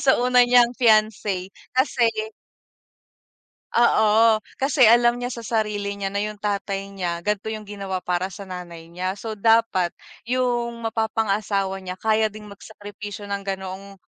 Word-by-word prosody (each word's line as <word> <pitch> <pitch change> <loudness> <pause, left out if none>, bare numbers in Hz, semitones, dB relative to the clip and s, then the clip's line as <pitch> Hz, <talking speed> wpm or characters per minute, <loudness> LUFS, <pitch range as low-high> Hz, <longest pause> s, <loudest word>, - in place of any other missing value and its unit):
sa 265 - +4
una 250 0 +4
niyang 245 -1 +5
fiance, 215 -5 +2 0.3
kasi 255 -3 +3 1.7
Oo, 220 -1 +4 0.2
kasi 270 -2 +4
alam 240 +1 +5
niya 245 0 -4
sa 235 - -7
sarili 210 -3 -2
niya 195 0 -3
na 200 - 0
yung 210 0 -4
tatay 200 -1 -2
niya, 175 -3 -3
ganito 210 +1 -1
yung 215 -1 -6
ginawa 200 -2 -4
para 180 +1 -1
sa 195 +1 -9
nanay 175 -3 -8
niya. 185 +3 -3
So 220 +1 -5
dapat 225 -4 +3 0.4
yung 240 -2 -1
mapapangasawa 210 -3 -1
niya 185 0 -6
kaya 220 +1 +2
ding 210 0 -11
magsakripisyo 205 0 -9
ng 200 0 -3
ganoong 195 0 -6
210 Hz, 140 wpm, -23 LUFS, 195-230 Hz, 1.7 s, niyang